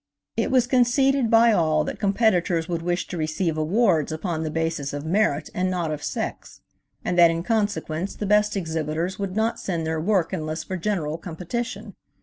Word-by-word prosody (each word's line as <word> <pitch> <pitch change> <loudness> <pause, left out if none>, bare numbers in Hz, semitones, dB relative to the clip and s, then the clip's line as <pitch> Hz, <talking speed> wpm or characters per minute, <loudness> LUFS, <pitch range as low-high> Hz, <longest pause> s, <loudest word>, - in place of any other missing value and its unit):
It - - 0
was 255 -2 +3
conceded 255 +1 +3
by 230 +1 +6
all 155 -6 +2
that - - -5
competitors 195 -5 +2
would 170 -2 -2
wish 175 +1 -1
to 180 - -6
receive 155 +1 -1
awards 165 0 +2
upon 160 0 -3
the 160 - -2
basis 160 -3 -2
of 145 +1 -5
merit 160 -4 +1
and 185 +1 0
not 175 -4 -1
of 150 -1 -5
sex, - - -5 0.4
and 175 - 0
that 170 -1 +8
in 165 0 -2
consequence 195 -5 -1
the 210 - -4
best 210 +1 +3
exhibitors 160 +1 -2
would 195 -1 -3
not 220 +2 0
send 170 -4 -2
their 160 0 -1
work 185 -1 +1
unless 155 -2 -3
for 185 - -5
general 170 -5 -2
competition. 205 +5 -5
175 Hz, 180 wpm, -24 LUFS, 160-210 Hz, 0.4 s, that